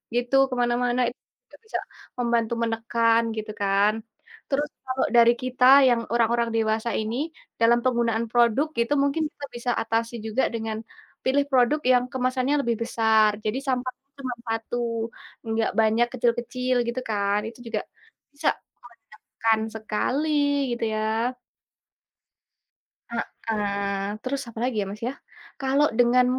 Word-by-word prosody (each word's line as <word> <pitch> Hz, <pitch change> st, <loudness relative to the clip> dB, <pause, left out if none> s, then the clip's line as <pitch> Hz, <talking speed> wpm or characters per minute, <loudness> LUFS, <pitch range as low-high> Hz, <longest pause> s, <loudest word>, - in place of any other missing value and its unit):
gitu 245 Hz, +2 st, 0 dB
ke 255 Hz, -, -3 dB
mana-mana 245 Hz, +1 st, +1 dB
itu 245 Hz, -, -14 dB, 0.3 s
juga -, -, -16 dB
bisa -, -, -3 dB, 0.4 s
membantu 235 Hz, -1 st, +1 dB
menekan 230 Hz, 0 st, +2 dB
gitu 215 Hz, 0 st, -4 dB
kan. 200 Hz, +1 st, +3 dB, 0.6 s
Terus 290 Hz, +2 st, 0 dB, 0.2 s
kalau 260 Hz, 0 st, 0 dB
dari 235 Hz, 0 st, +7 dB
kita 255 Hz, 0 st, +1 dB, 0.2 s
yang 240 Hz, -2 st, +3 dB
orang-orang 235 Hz, 0 st, +2 dB
dewasa 220 Hz, +1 st, 0 dB
ini 220 Hz, +2 st, -3 dB, 0.5 s
dalam 235 Hz, +1 st, +5 dB
penggunaan 235 Hz, -2 st, +1 dB
produk 240 Hz, +5 st, +3 dB
itu 235 Hz, +5 st, +1 dB
mungkin 280 Hz, +3 st, +1 dB
kita 285 Hz, -, -7 dB
bisa 240 Hz, +1 st, -1 dB
atasi 230 Hz, +1 st, -1 dB
juga 220 Hz, +4 st, 0 dB
dengan, 220 Hz, -1 st, -3 dB, 0.5 s
pilih 280 Hz, +2 st, +3 dB
produk 260 Hz, +4 st, +4 dB
yang 250 Hz, -1 st, +5 dB
kemasannya 255 Hz, +2 st, 0 dB
lebih 235 Hz, -3 st, 0 dB
besar 220 Hz, -2 st, +3 dB
jadi 215 Hz, +1 st, -2 dB
sampahnya 255 Hz, +1 st, -3 dB
cuma 255 Hz, -2 st, -3 dB
1 230 Hz, 0 st, -2 dB, 0.4 s
nggak 225 Hz, 0 st, 0 dB
banyak 220 Hz, +2 st, +3 dB
kecil-kecil 250 Hz, +1 st, 0 dB
gitu 240 Hz, +2 st, -2 dB
kan 200 Hz, -1 st, +1 dB
itu 230 Hz, +2 st, -10 dB
juga, 215 Hz, -2 st, -1 dB, 0.5 s
bisa 285 Hz, -, +1 dB, 0.3 s
menekan 225 Hz, -1 st, -3 dB, 0.2 s
sekali 220 Hz, +7 st, -1 dB, 0.5 s
gitu 235 Hz, -, -5 dB
ya. 215 Hz, -, -1 dB, 2.1 s
Heeh, 200 Hz, -3 st, -2 dB
terus 265 Hz, +1 st, -2 dB
apalagi 235 Hz, +2 st, -2 dB
ya -, -, -2 dB
Mas 210 Hz, +1 st, -8 dB
ya, -, -, -5 dB, 0.5 s
kalau 270 Hz, +2 st, +3 dB
dengan 245 Hz, +1 st, +5 dB
235 Hz, 130 wpm, -25 LUFS, 225-255 Hz, 2.1 s, dari